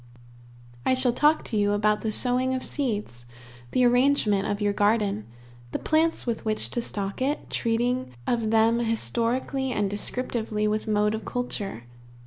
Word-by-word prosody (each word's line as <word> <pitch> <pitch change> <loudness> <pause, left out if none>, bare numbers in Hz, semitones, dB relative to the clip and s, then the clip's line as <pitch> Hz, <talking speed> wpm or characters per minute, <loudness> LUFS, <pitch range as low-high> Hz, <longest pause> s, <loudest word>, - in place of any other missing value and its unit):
I 260 - +3
shall 255 -2 +1
talk 300 +5 +3
to - - -5
you 205 0 +2
about 210 0 +2
the 220 - -1
sowing 255 +3 +2
of 255 - -3
seeds, 210 - -3 0.4
the 250 - +3
arrangement 245 -5 +3
of 205 - -2
your 205 -1 +1
garden, 205 - +1 0.5
the - - +1
plants 320 +1 +1
with 235 -2 -2
which 215 -1 -1
to 240 - -1
stock 200 -1 -4
it, 280 +3 -1
treating 240 +2 0 0.2
of 230 -3 0
them 225 +1 +3
historically 240 +3 -1
and 205 -4 0
descriptively, 215 0 -2
with 215 +1 -1
mode 210 0 +2
of 220 - -4
culture. 205 - -4
225 Hz, 155 wpm, -26 LUFS, 210-250 Hz, 0.5 s, I